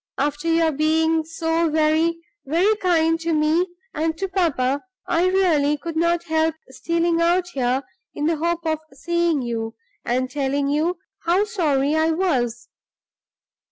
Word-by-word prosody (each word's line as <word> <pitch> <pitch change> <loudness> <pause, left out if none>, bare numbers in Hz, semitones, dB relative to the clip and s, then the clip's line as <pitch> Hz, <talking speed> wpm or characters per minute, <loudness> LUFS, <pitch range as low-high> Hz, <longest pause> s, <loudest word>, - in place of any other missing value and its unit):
After 290 +3 -1
your 330 -1 +3
being 320 +2 +2
so 330 +1 0
very, 315 +2 +2 0.3
very 350 +10 +2
kind 330 -4 +2
to 330 0 -1
me 310 +4 +2 0.3
(and 320 +1 -1
to 390 - -2
papa), 285 -8 0 0.2
I 345 +2 +2
really 325 -6 +2
could 330 +2 -6
not 340 +1 +1
help 320 -1 +1 0.2
stealing 335 +3 0
out 350 +1 +2
here 260 -3 0 0.3
in 295 - -2
the 325 0 +1
hope 335 +1 -1
of 315 -1 0
seeing 340 0 0
you, 225 -1 -4 0.3
and 255 +2 0
telling 280 +1 -1
you 315 +5 0 0.3
how 355 +4 +3
sorry 305 -10 0
I 315 +1 +2
was. 255 -9 0
320 Hz, 145 wpm, -22 LUFS, 290-340 Hz, 0.3 s, your